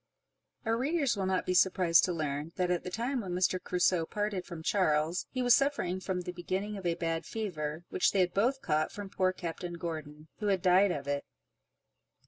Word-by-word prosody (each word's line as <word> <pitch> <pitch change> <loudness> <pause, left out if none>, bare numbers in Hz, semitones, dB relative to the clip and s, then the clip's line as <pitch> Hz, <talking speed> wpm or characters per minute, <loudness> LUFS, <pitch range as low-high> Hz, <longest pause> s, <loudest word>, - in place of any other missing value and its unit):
Our 225 +1 +1
readers 280 -2 +1
will 195 -2 -1
not 190 -1 0
be 185 - 0
surprised 180 -2 +4
to 185 - -1
learn, 155 -1 -3
that 180 -1 0
at 175 - 0
the - - -4
time 240 +7 -2
when 185 -4 -5
Mr. 185 0 +1
Crusoe 180 -2 +1
parted 205 -3 -2
from 170 -3 -7
Charles, 160 -3 +1
he 255 -1 -2
was 245 -1 +6
suffering 260 -11 +1
from 185 -1 -2
the 180 0 -5
beginning 185 +4 -3
of 190 -3 -4
a 170 - +1
bad 165 -1 -2
fever, 160 -7 -4
which - - +3
they 195 - +3
had 180 -1 +1
both 255 +7 +1
caught 155 0 +1
from 205 -1 -7
poor 185 -1 +2
Captain 175 -1 -5
Gordon, 155 -2 -6
who 210 - -2
had 195 -3 +1
died 185 +2 +5
of 140 -5 -3
it. 140 0 -1
180 Hz, 205 wpm, -31 LUFS, 165-200 Hz, -, was